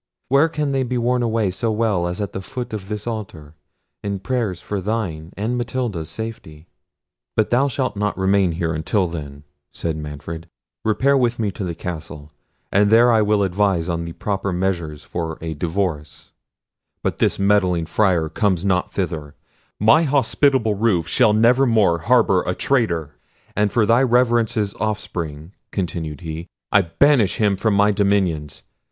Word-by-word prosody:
Where 140 +5 +4
can 150 -3 -2
they 135 -1 +1
be 125 -1 -1
worn 125 +1 +1
away 115 -4 +1
so 115 +4 -1
well 105 -5 +1
as 90 +2 -4
at 100 -2 -3
the 95 - -4
foot 125 +4 -6
of 100 -2 -6
this 105 -1 -4
altar, 95 -10 -6 0.5
in 100 -1 -2
prayers 105 -3 -2
for 100 +1 -4
thine 90 -6 -3
and 110 +5 -1
Matilda's 120 -10 -3
safety?" 85 -8 -7 0.7
"But 110 - +1
thou 130 +4 +3
shalt 130 -5 -2
not 105 0 -1
remain 95 -2 +2
here 85 -1 -1
until 90 +5 0
then," 70 -4 -7 0.3
said 80 -2 -3
Manfred. 75 +2 -7 0.4
"Repair 130 +6 +2
with 120 -3 +1
me 105 -3 -1
to 100 - -6
the 85 -2 -3
castle, 75 -4 -7 0.4
and 100 +1 +4
there 120 +2 +6
I 110 -2 +4
will 105 -1 +2
advise 95 -2 +1
on 85 -1 -2
the 85 - -6
proper 100 0 -2
measures 85 -5 -2
for 80 -2 -4
a 80 -1 -4
divorce;—but 80 -1 -5
this - - +2
meddling 95 -4 +2
Friar 90 -3 +2
comes 95 +2 0
not 90 -2 +1
thither; 80 -6 -4 0.4
my 110 +9 +5
hospitable 135 -5 +2
roof 100 -6 +1
shall 115 -5 +3
never 120 +5 +4
more 105 -8 +3
harbour 110 -1 +3
a 90 - 0
traitor—and 100 - -2
for 115 -3 +3
thy 115 +3 +4
Reverence's 120 -4 +2
offspring," 85 -7 -4 0.2
continued 80 -5 -4
he, 80 +1 -6 0.2
"I 100 - +6
banish 100 - +3
him 105 -3 +2
from 105 +2 +1
my 100 +1 +4
dominions. 95 -8 0
100 Hz, 160 wpm, -21 LUFS, 85-115 Hz, 0.7 s, there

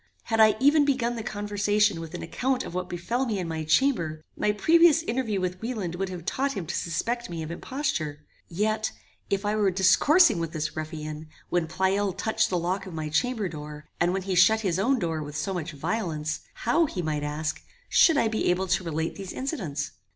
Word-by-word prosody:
Had 225 -1 -1
I 215 -1 +7
even 290 +3 +5
begun 255 -4 +1
the 230 - -4
conversation 205 -2 +1
with 165 +1 -7
an - - -5
account 260 0 -1
of - - -8
what 180 0 -3
befel 235 +9 -2
me 215 -3 -1
in 180 -3 -3
my 160 -1 -3
chamber, 155 - +1
my 210 - +1
previous 325 +8 +5
interview 230 -7 -1
with 185 0 -3
Wieland 220 -7 -3
would 190 +2 -3
have 175 -3 -7
taught 275 +7 0
him 195 -6 -4
to - - -4
suspect 235 +8 -2
me 165 -2 -4
of 155 - -6
imposture; 170 - -3 0.2
yet, 215 +4 -1 0.4
if 200 +1 -1
I 210 +1 +1
were 210 -2 +3
discoursing 205 - +5
with 165 -1 -3
this 155 -1 -3
ruffian, 155 -1 -6 0.2
when 175 -2 +1
Pleyel 190 +3 0
touched 220 +3 0
the 180 - 0
lock 180 +3 -2
of 175 - -8
my 155 -1 -3
chamber 215 +7 0
door, 150 -2 -8
and 175 +1 +3
when 190 0 -2
he 190 0 -2
shut 190 +5 +5
his 185 -4 0
own 260 +7 +2
door 165 -7 -2
with 150 0 -6
so 170 +6 -2
much 170 -2 -4
violence, 155 -2 -2 0.3
how, 315 +8 +3
he 180 -9 -4
might 155 -2 -1
ask, 150 +2 -3 0.3
should 325 -5 +5
I 230 - +3
be 220 -3 0
able 180 +2 +1
to 185 - +2
relate 160 -1 -3
these 195 -2 -6
incidents? 175 - -3
190 Hz, 210 wpm, -26 LUFS, 160-225 Hz, 0.4 s, I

